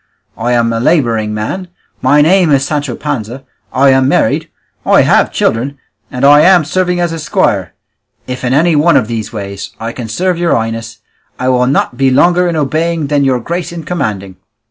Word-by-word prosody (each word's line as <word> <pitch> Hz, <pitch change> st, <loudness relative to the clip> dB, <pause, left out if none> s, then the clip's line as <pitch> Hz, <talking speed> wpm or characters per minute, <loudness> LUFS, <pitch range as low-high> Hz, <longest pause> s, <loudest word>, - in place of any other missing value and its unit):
I 120 Hz, +2 st, -1 dB
am 115 Hz, -1 st, +1 dB
a 115 Hz, -, -1 dB
labouring 115 Hz, -7 st, +1 dB
man, 110 Hz, -, -4 dB, 0.3 s
my 145 Hz, +3 st, +4 dB
name 180 Hz, +1 st, +3 dB
is 135 Hz, -2 st, +2 dB
Sancho 145 Hz, -4 st, -3 dB
Panza, 135 Hz, -3 st, -5 dB, 0.3 s
I 135 Hz, +1 st, +3 dB
am 130 Hz, 0 st, +3 dB
married, 140 Hz, -, 0 dB, 0.3 s
I -, -, +4 dB
have -, -, +2 dB
children, 135 Hz, +5 st, -1 dB, 0.3 s
and 125 Hz, +2 st, -1 dB
I 145 Hz, +1 st, +7 dB
am 180 Hz, -2 st, +5 dB
serving 180 Hz, +1 st, -1 dB
as 175 Hz, -1 st, 0 dB
a 165 Hz, -, -5 dB
squire; 145 Hz, -6 st, -1 dB, 0.5 s
if 125 Hz, 0 st, -6 dB
in 125 Hz, -, -1 dB
any 160 Hz, +4 st, +2 dB
one 150 Hz, +1 st, +4 dB
of 120 Hz, -5 st, 0 dB
these 110 Hz, -3 st, -4 dB
ways 100 Hz, -2 st, -7 dB
I 115 Hz, +1 st, -4 dB
can 120 Hz, -1 st, -7 dB
serve 180 Hz, +8 st, -1 dB
your 175 Hz, -1 st, +1 dB
highness, 115 Hz, 0 st, -4 dB, 0.4 s
I 130 Hz, -, -1 dB
will 125 Hz, -1 st, +2 dB
not 130 Hz, -2 st, 0 dB
be 135 Hz, 0 st, +2 dB
longer 175 Hz, +7 st, +3 dB
in 170 Hz, -, -1 dB
obeying 155 Hz, +1 st, -1 dB
than 145 Hz, -1 st, +2 dB
your 130 Hz, -2 st, +1 dB
grace 170 Hz, +9 st, -4 dB
in 170 Hz, -1 st, -7 dB
commanding." 105 Hz, -, -4 dB
135 Hz, 190 wpm, -13 LUFS, 115-165 Hz, 0.5 s, I